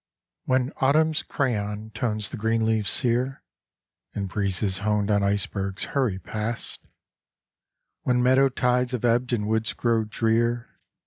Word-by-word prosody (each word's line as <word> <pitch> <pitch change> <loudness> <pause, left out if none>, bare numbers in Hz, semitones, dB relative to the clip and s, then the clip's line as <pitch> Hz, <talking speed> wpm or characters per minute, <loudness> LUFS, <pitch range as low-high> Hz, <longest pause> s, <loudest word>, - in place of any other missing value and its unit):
When 130 +1 +1
Autumn's 155 +3 +3
crayon 110 -5 -2
tones 110 -2 -1
the - - -4
green 115 +1 +1
leaves 110 -2 +1
sere, 125 +1 +1 0.7
And 100 -1 -2
breezes 95 -1 0
honed 105 0 0
on 100 -1 +3
icebergs 100 -1 -1
hurry 130 -9 +1
past; 110 +5 -3 1.1
When 125 -1 +1
meadow 130 +2 +5
tides 125 0 0
have 125 -1 -1
ebbed 120 +2 +2
and 105 -4 0
woods 110 +1 0
grow 115 -2 +1
drear. 115 +2 0
115 Hz, 130 wpm, -25 LUFS, 105-125 Hz, 1.1 s, meadow